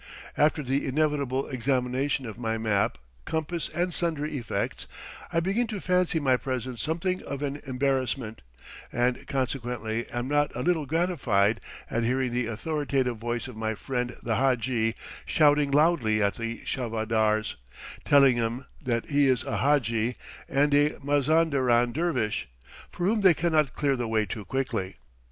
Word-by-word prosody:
After 150 Hz, 0 st, +2 dB
the 135 Hz, +2 st, -1 dB
inevitable 140 Hz, -2 st, 0 dB
examination 130 Hz, +1 st, 0 dB
of 110 Hz, -2 st, -7 dB
my 115 Hz, -2 st, -1 dB
map, 110 Hz, -3 st, +1 dB, 0.3 s
compass, 160 Hz, +1 st, -2 dB
and 175 Hz, +1 st, -1 dB
sundry 155 Hz, -3 st, -1 dB
effects, 120 Hz, -4 st, -3 dB, 0.4 s
I 165 Hz, -, +2 dB
begin 200 Hz, +7 st, 0 dB
to 215 Hz, -3 st, -4 dB
fancy 180 Hz, -3 st, +1 dB
my 130 Hz, -4 st, +3 dB
presence 130 Hz, -2 st, -4 dB
something 170 Hz, +4 st, -1 dB
of 140 Hz, +1 st, -5 dB
an 145 Hz, 0 st, -3 dB
embarrassment, 130 Hz, -3 st, -1 dB, 0.5 s
and 120 Hz, +1 st, 0 dB
consequently 120 Hz, -4 st, -2 dB
am 120 Hz, +1 st, -3 dB
not 145 Hz, +1 st, +1 dB
a 125 Hz, -, -2 dB
little 165 Hz, -5 st, +1 dB
gratified 130 Hz, -, +1 dB, 0.3 s
at 115 Hz, -, -1 dB
hearing 125 Hz, +1 st, +1 dB
the 120 Hz, -1 st, -1 dB
authoritative 135 Hz, 0 st, -1 dB
voice 120 Hz, +2 st, -3 dB
of 125 Hz, -, -9 dB
my 110 Hz, 0 st, -2 dB
friend 125 Hz, +1 st, -3 dB
the 115 Hz, -2 st, 0 dB
hadji 120 Hz, -3 st, +1 dB, 0.3 s
shouting 145 Hz, -2 st, +4 dB
loudly 140 Hz, -7 st, +3 dB
at 100 Hz, -, +2 dB
the 115 Hz, 0 st, -5 dB
charvadars, 110 Hz, -3 st, 0 dB, 0.5 s
telling 140 Hz, -3 st, +5 dB
them 120 Hz, +3 st, -2 dB, 0.2 s
that 120 Hz, -3 st, -1 dB
he 145 Hz, -1 st, +3 dB
is 130 Hz, -3 st, +2 dB
a -, -, -2 dB
hadji 120 Hz, -5 st, +1 dB, 0.3 s
and 145 Hz, +1 st, +2 dB
a 145 Hz, +1 st, +3 dB
Mazanderan 140 Hz, -4 st, +3 dB
dervish, 125 Hz, -, -1 dB, 0.4 s
for 175 Hz, -, -3 dB
whom 215 Hz, +2 st, +2 dB
they 185 Hz, -4 st, +6 dB
cannot 155 Hz, -5 st, +1 dB
clear 140 Hz, -2 st, +1 dB
the 120 Hz, -2 st, -2 dB
way 110 Hz, -1 st, +1 dB
too 105 Hz, -1 st, -6 dB
quickly. 130 Hz, -8 st, -2 dB
130 Hz, 150 wpm, -27 LUFS, 115-150 Hz, 0.5 s, they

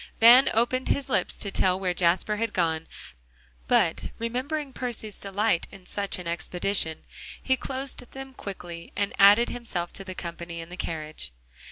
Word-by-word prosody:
Van 240 Hz, +4 st, +9 dB
opened 245 Hz, +3 st, +2 dB
his 275 Hz, -1 st, 0 dB
lips -, -, 0 dB
to 200 Hz, -, -3 dB
tell 185 Hz, -1 st, +2 dB
where 185 Hz, -2 st, 0 dB
Jasper 180 Hz, +4 st, +2 dB
had 225 Hz, 0 st, -1 dB
gone, 160 Hz, -2 st, 0 dB, 0.8 s
but -, -, +2 dB
remembering 265 Hz, +5 st, -2 dB
Percy's 235 Hz, -5 st, -4 dB
delight 200 Hz, -2 st, +1 dB
in 185 Hz, -, -13 dB
such 200 Hz, +1 st, -2 dB
an 180 Hz, -, -8 dB
expedition, 175 Hz, -1 st, -1 dB, 0.4 s
he 260 Hz, -, +2 dB
closed 265 Hz, +1 st, -5 dB
them 270 Hz, 0 st, -8 dB
quickly, 175 Hz, -7 st, -8 dB
and 200 Hz, -1 st, 0 dB
added 205 Hz, +4 st, +8 dB
himself 190 Hz, -8 st, -4 dB
to 195 Hz, -, -6 dB
the 185 Hz, -1 st, -7 dB
company 170 Hz, -1 st, -6 dB
in 165 Hz, 0 st, -8 dB
the 180 Hz, -, -7 dB
carriage. 155 Hz, -, -4 dB
200 Hz, 160 wpm, -27 LUFS, 175-240 Hz, 0.8 s, Van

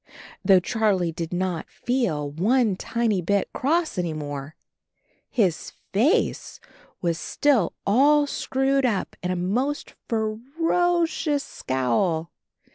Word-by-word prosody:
Though 190 Hz, -2 st, +6 dB
Charlie 195 Hz, -4 st, +1 dB
did 165 Hz, 0 st, -5 dB
not 180 Hz, -2 st, -2 dB
feel 205 Hz, -, -1 dB
one 215 Hz, -, +2 dB
tiny 225 Hz, -1 st, 0 dB
bit 200 Hz, +3 st, 0 dB
cross 315 Hz, -, 0 dB
any 170 Hz, -3 st, -1 dB
more, 145 Hz, -1 st, -6 dB, 0.7 s
his 190 Hz, -9 st, 0 dB, 0.2 s
face 285 Hz, -, +1 dB, 0.4 s
was 170 Hz, -1 st, 0 dB
still 260 Hz, -, +1 dB
all 290 Hz, +8 st, +5 dB
screwed 275 Hz, -1 st, 0 dB
up 225 Hz, -6 st, -1 dB
in 180 Hz, -, -2 dB
a 185 Hz, -, 0 dB
most 240 Hz, +12 st, -1 dB, 0.2 s
fer 220 Hz, -1 st, -1 dB, 0.3 s
o 350 Hz, -1 st, +3 dB
cious 295 Hz, -3 st, -1 dB
scowl. 130 Hz, +6 st, -1 dB
205 Hz, 120 wpm, -24 LUFS, 170-265 Hz, 0.7 s, Though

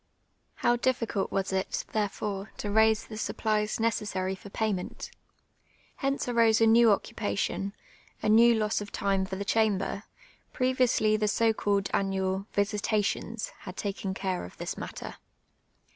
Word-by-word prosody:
How 240 Hz, -, +2 dB
difficult 235 Hz, -5 st, 0 dB
was 195 Hz, 0 st, -1 dB
it, 190 Hz, 0 st, -1 dB
therefore, 205 Hz, -1 st, -2 dB
to 205 Hz, -, -3 dB
raise 220 Hz, +1 st, +4 dB
the 215 Hz, -, -8 dB
supplies 215 Hz, -1 st, -1 dB
necessary 205 Hz, -4 st, 0 dB
for 195 Hz, +1 st, -10 dB
payment. 200 Hz, -3 st, -3 dB, 0.9 s
Hence 275 Hz, -1 st, -1 dB
arose 230 Hz, -2 st, +4 dB
a 225 Hz, -, +5 dB
new 225 Hz, 0 st, +6 dB
occupation, 200 Hz, -2 st, -1 dB, 0.5 s
a -, -, -2 dB
new 230 Hz, +2 st, +6 dB
loss 215 Hz, -1 st, 0 dB
of 205 Hz, -, -7 dB
time 195 Hz, -1 st, 0 dB
for 190 Hz, -, -4 dB
the 200 Hz, +1 st, -4 dB
chamber; 200 Hz, -3 st, +1 dB, 0.5 s
previously 255 Hz, -4 st, +2 dB
the 215 Hz, 0 st, 0 dB
so 225 Hz, +2 st, +3 dB
called 200 Hz, -2 st, 0 dB
annual 190 Hz, 0 st, 0 dB
" -, -, -36 dB
visi 205 Hz, +1 st, +1 dB
tations" 215 Hz, +2 st, -1 dB
' -, -, -25 dB
had 185 Hz, -1 st, -8 dB
taken 195 Hz, -2 st, -3 dB
care 190 Hz, -2 st, -2 dB
of 90 Hz, -, -10 dB
this -, -, -4 dB
matter. -, -, -7 dB
210 Hz, 150 wpm, -28 LUFS, 195-225 Hz, 0.9 s, new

